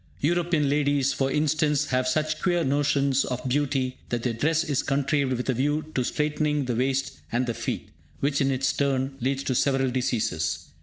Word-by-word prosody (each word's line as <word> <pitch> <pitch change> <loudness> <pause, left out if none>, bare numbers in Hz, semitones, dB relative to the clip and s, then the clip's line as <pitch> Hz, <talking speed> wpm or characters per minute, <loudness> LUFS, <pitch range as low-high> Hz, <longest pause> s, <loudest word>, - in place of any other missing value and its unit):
European 170 -1 +1
ladies, 140 -1 +2
for 135 0 0
instance, 150 0 +1
have 130 0 +1
such 155 +3 0
queer 175 -2 +2
notions 140 -1 +2
of 125 -1 -3
beauty 130 -1 0
that 120 -1 -2
their 120 - 0
dress 155 +7 +1
is 145 -5 0
contrived 140 -1 0
with 125 0 -3
a 130 - +2
view 145 +5 0
to 130 - +1
straitening 150 +1 0
the 125 - -1
waist 135 +2 -1
and 120 +2 +1
the 120 - -2
feet, - - -4 0.3
which, 140 +1 +1
in 135 - +2
its 135 0 +1
turn, 135 -1 0
leads 135 +2 0
to 130 - -1
several 135 0 +2
diseases. 115 -10 -1
140 Hz, 185 wpm, -26 LUFS, 130-150 Hz, 0.3 s, ladies